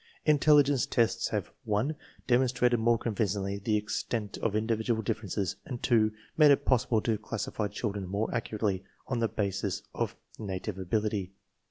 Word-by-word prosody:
Intelligence 145 -3 +5
tests 115 -2 +1
have - - -1
■ - - -24
4 - - -24
(1) 110 +9 0 0.3
demonstrated 125 -1 +3
more 115 +1 +3
convincingly 100 -3 -1
the 105 +2 +1
extent 105 0 -3
of 110 - 0
^individual 110 +1 0
differences 100 -3 -2
and 125 -4 -7
(2) 110 -3 +4 0.2
made 155 -2 +7
_it_possible 125 -5 +3
to 110 -3 0
classify 110 -1 -3
children 100 -1 -3
more 100 +4 -2
accurately 105 -4 -1 0.2
on 125 -2 -2
the 115 - +2
basis 100 -2 -2
of - - -2 0.2
native 95 -1 -4
^ability. 100 0 -1
110 Hz, 150 wpm, -30 LUFS, 100-120 Hz, 0.3 s, made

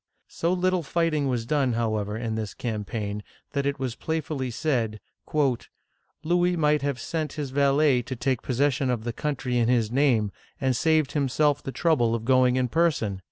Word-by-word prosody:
So 170 - -1
little 185 0 +1
fighting 155 -2 0
was 120 -3 -1
done, 135 -2 +1
however, 110 -2 -1
in 115 -1 -3
this 110 -2 -4
campaign, 105 -2 -3 0.3
that 140 -1 -1
it 140 - -1
was 130 -3 -3
playfully 150 -2 -3
said, 115 -5 -1 1.2
"Louis 175 +2 +2
might 150 -2 +3
have 140 -3 -2
sent 155 +5 -3
his 145 -4 -4
valet 140 -1 +3
to 130 +2 -6
take 125 0 -1
possession 135 +1 +1
of 120 -3 -1
the 120 0 -3
country 130 -3 -2
in 115 0 +2
his 115 -3 +2
name, 120 -6 +2 0.3
and 135 - +1
have 130 - +2
saved 155 -1 +2
himself 145 +1 +1
the 135 - -5
trouble 130 -8 +2
of 115 -1 -5
going 130 0 +4
in 130 -1 +1
person 135 - +1
130 Hz, 175 wpm, -26 LUFS, 115-150 Hz, 1.2 s, going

